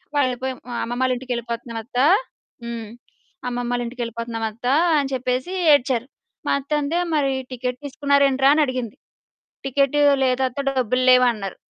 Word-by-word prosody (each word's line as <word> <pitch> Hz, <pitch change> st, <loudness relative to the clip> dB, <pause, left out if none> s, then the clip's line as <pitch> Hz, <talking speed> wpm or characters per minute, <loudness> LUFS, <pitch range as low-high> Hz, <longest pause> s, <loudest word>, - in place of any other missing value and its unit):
వాళ్ళు 260 Hz, -3 st, +2 dB
పేం 260 Hz, -1 st, -2 dB, 0.3 s
"అమ్మమ్మాళ్ళింటికెళ్ళిపోతున్నామత్త" 240 Hz, -1 st, -3 dB, 0.7 s
హ్మ్ 230 Hz, -2 st, -6 dB, 0.6 s
"అమ్మమ్మాళ్ళింటికెళ్ళిపోతున్నాం 240 Hz, -1 st, -3 dB
అత్త" 230 Hz, +3 st, -7 dB, 0.3 s
అని 280 Hz, -2 st, 0 dB
చెప్పేసి 255 Hz, +6 st, -2 dB, 0.2 s
ఏడ్చారు. 255 Hz, -3 st, +1 dB, 0.4 s
మా -, -, +2 dB
అత్తంది 295 Hz, +3 st, -1 dB, 0.2 s
మరి 280 Hz, -2 st, +2 dB, 0.2 s
"టికెట్ 250 Hz, 0 st, -3 dB
తీసుకున్నార 280 Hz, 0 st, +1 dB
ఏంట్రా?" 270 Hz, 0 st, +3 dB
అని 310 Hz, -, +3 dB
అడిగింది, 255 Hz, -3 st, -4 dB, 0.7 s
"టికెట్ 275 Hz, +1 st, +1 dB, 0.3 s
లేదత్త 255 Hz, 0 st, 0 dB
డబ్బులు 255 Hz, -1 st, 0 dB
లేవు" 250 Hz, 0 st, +7 dB
అన్నారు. 195 Hz, -4 st, -6 dB
255 Hz, 115 wpm, -22 LUFS, 235-270 Hz, 0.7 s, లేవు